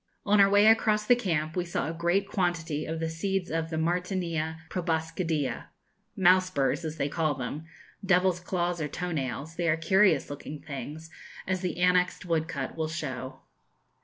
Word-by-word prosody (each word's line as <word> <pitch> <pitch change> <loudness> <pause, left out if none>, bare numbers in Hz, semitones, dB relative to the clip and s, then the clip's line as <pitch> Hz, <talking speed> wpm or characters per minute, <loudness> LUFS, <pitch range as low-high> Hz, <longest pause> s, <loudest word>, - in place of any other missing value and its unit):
On 205 0 +5
our 195 - +6
way 205 +1 +5
across 215 -1 +4
the 245 - +6
camp 165 -9 -1
we 180 - 0
saw 170 -5 -2
a 165 - -3
great 175 +4 +1
quantity 170 -6 -1
of 160 +1 -3
the 165 - -1
seeds 180 +3 -2
of 165 0 -1
the 160 - -3
Martynia 170 -1 -1
proboscidea, 160 -5 -1 0.5
mouse 185 0 +5
burrs 140 0 0
as 160 0 -4
they 140 - 0
call 155 0 0
them, 135 +5 -5 0.4
devil's 185 -1 +3
claws 175 -1 -2
or 150 - -1
toe 180 +4 -4
nails: 145 +2 -4
they 170 -1 +1
are 155 - +3
curious 190 +4 +3
looking 145 +1 -7
things, 150 +3 -7 0.3
as 185 -1 -1
the 180 -2 -2
annexed 180 0 +2
woodcut 160 -5 -2
will 160 -1 -1
show. 130 -5 -5
165 Hz, 170 wpm, -28 LUFS, 155-185 Hz, 0.5 s, our